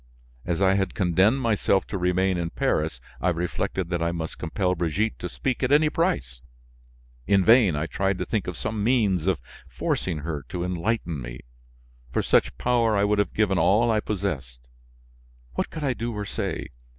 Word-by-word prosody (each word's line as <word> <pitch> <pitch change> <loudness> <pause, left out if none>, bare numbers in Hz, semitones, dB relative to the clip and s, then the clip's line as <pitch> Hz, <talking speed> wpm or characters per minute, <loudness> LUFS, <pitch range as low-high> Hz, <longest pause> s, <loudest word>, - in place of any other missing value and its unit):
As 85 +2 0
I 95 0 +5
had 95 -2 0
condemned 95 +7 +3
myself 105 -4 +2
to 100 - -4
remain 90 +1 +2
in 85 -1 -2
Paris, 75 -5 -1 0.2
I 90 - +2
reflected 90 +1 -2
that 85 -1 0
I 85 0 +1
must 80 -2 -5
compel 90 +2 0
Brigitte 90 +5 -1
to 90 - -4
speak 130 +7 -2
at 130 0 +1
any 150 +1 +5
price. 65 - -1 0.9
In 95 -2 +4
vain, 110 -7 +6
I 75 +2 -1
tried 95 +3 -1
to - - -3
think 105 -4 -2
of 90 - -4
some 110 -1 -3
means 105 -8 +2
of 95 -5 +2 0.3
forcing 90 -4 -2
her 75 -4 -3
to 85 - -3
enlighten 90 - -2
me; 65 0 -7 0.7
for - - 0
such - - +2
power, 115 - +2
I 100 - +3
would 105 0 +2
have 100 - 0
given 100 -4 +2
all 110 +8 +4
I 110 - +2
possessed. 70 - -4 0.9
What - - -2
could 155 - -6
I 135 -3 +1
do 120 0 -3
or 105 - -3
say? 100 -3 -3
95 Hz, 185 wpm, -25 LUFS, 85-110 Hz, 0.9 s, vain